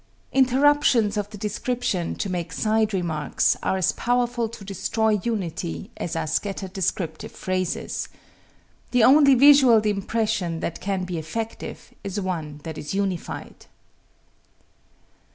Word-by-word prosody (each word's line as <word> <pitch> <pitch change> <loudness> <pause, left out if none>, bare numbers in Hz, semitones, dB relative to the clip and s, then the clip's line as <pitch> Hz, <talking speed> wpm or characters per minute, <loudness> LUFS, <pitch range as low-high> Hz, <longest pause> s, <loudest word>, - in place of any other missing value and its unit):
Interruptions 260 -4 +4
of 205 -1 -2
the 210 - -9
description 210 -3 -2
to - - -3
make 175 -3 -3
side 220 +2 +1
remarks 170 -6 0
are 190 - 0
as 185 - +2
powerful 240 -1 0
to 215 -3 -10
destroy 210 +2 0
unity 170 - -3
as 165 - -4
are 165 - -1
scattered 190 +4 -3
descriptive 175 -4 -2
phrases. 185 -1 -3 0.8
The 245 -2 +3
only 275 +2 +7
visual 270 -3 +7
impression 200 -4 -1
that 170 - -4
can 195 -1 -1
be 180 -2 -3
effective 220 +9 -6
is 200 +1 -3
one 160 -6 -4
that 160 -1 -6
is 150 - -5
unified. 195 -4 -4
200 Hz, 125 wpm, -24 LUFS, 175-230 Hz, 0.8 s, only